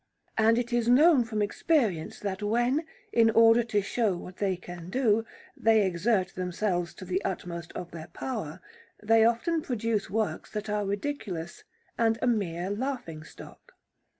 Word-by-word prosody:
And 225 +1 +4
it 240 0 -2
is 240 -1 +1
known 285 +1 +6
from 215 -2 -1
experience 205 - 0
that 195 -1 -3
when, 240 +9 +1 0.3
in 230 -1 +5
order 230 +1 +6
to 210 -3 0
show 205 -3 0
what 180 +1 -10
they 195 -3 0
can 175 -1 -9
do, 225 -1 +2 0.3
they 220 -2 +4
exert 185 +2 +1
themselves 180 -1 -2
to 185 - -9
the 185 +1 -1
utmost 175 -3 -4
of 175 -1 -7
their 160 -1 -8
power, 175 - -5 0.4
they 225 +1 +5
often 235 +9 +2
produce 230 -6 -2
works 220 0 -2
that 210 0 -4
are 210 -1 -1
ridiculous 200 - -4 0.3
and 225 -1 +3
a - - -1
mere 190 -6 0
laughing 210 - -4
stock. - - -14
210 Hz, 155 wpm, -28 LUFS, 185-235 Hz, 0.4 s, known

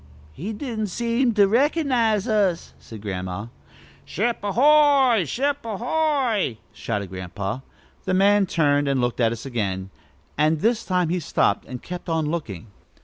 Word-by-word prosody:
"He 185 - -5
don't 220 -2 -4
seem 235 +4 0
to 200 -2 +5
recognize 245 - +2
us," 200 -6 0
said 110 -2 -11
Grandma. 95 +2 -5 0.5
"Ship 230 +6 -1
a 205 - -2
hoy! 275 - +5
Ship 280 - -1
a 220 -3 -4
hoy!" 250 - 0 0.2
shouted 100 -5 -4
Grandpa. 95 +4 -5 0.5
The 185 - +1
man 200 +1 +4
turned 145 -4 +2
and 135 -1 +1
looked 120 0 -1
at 115 -2 +3
us 115 +1 -6
again, 95 -7 -3 0.5
and 155 +1 +2
this 230 +1 +1
time 180 -3 +1
he 180 +2 0
stopped 160 - 0
and 125 -2 -8
kept 180 -1 -7
on 160 -1 0
looking. 150 - -4
185 Hz, 150 wpm, -23 LUFS, -, 0.5 s, to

